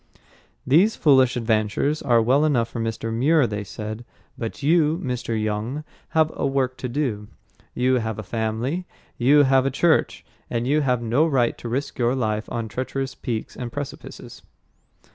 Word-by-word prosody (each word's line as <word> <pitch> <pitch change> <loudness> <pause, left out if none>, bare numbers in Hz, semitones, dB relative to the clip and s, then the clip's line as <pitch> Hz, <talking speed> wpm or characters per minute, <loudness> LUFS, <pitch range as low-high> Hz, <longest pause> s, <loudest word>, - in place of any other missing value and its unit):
"These 175 +12 +4
foolish 130 -5 +4
adventures 110 +6 0
are 120 -3 +3
well 135 +6 +3
enough 125 -7 +2
for 115 - -6
Mr. 115 0 -3
Muir," 145 +5 +3
they 105 -2 -3
said, 105 +5 -7 0.3
"but 115 +4 -6
you, 160 +1 +3
Mr. 125 -5 -3
Young, 110 +7 -2 0.3
have 160 0 +4
a - - -4
work 135 -2 0
to 125 0 -4
do; 120 -6 -2 0.5
you 125 +1 +2
have 110 -2 -3
a 110 - -5
family; 115 - -2 0.3
you 145 +4 +5
have 135 -1 +3
a - - +2
church, 160 +5 +1 0.2
and 115 0 -1
you 150 +4 +2
have 125 -4 0
no 125 +8 +2
right 130 -6 +1
to 120 - -6
risk 135 +4 -3
your 120 +1 +2
life 110 -4 -2
on 115 -1 -3
treacherous 135 +3 -4
peaks 115 -4 -5
and 120 -2 -6
precipices." 145 +1 -8
125 Hz, 165 wpm, -23 LUFS, 115-140 Hz, 0.5 s, you